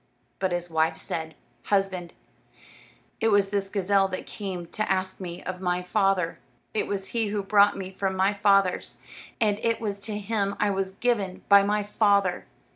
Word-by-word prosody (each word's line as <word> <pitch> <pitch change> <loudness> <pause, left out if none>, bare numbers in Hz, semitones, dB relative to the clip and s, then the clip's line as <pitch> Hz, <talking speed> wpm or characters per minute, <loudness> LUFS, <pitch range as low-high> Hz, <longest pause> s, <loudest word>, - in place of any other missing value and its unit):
But 190 -1 0
his 175 0 -2
wife 160 -1 +1
said: 160 -1 -4 0.3
"Husband, 195 -4 0 1.1
it 225 - +2
was 205 -2 +3
this 200 -1 -1
gazelle 195 0 +2
that 185 -1 -5
came 190 -4 -5
to 215 +2 -2
ask 190 0 -1
me 180 -1 -7
of 185 0 -5
my 180 -1 0
father, 195 -3 +1 0.3
it 215 - -1
was 195 -1 -3
he 230 -2 0
who 205 0 -2
brought 200 +1 +4
me 190 -1 -6
from 190 0 -2
my 190 +2 +3
father's, 195 -2 +2 0.4
and 210 -3 +2
it 230 0 +1
was 205 -3 -3
to 205 +1 -5
him 200 -1 -1
I 210 - +2
was 190 -1 -2
given 200 -4 -1
by 200 0 +9
my 205 +1 +1
father. 200 -3 +2
195 Hz, 175 wpm, -26 LUFS, 185-205 Hz, 1.1 s, by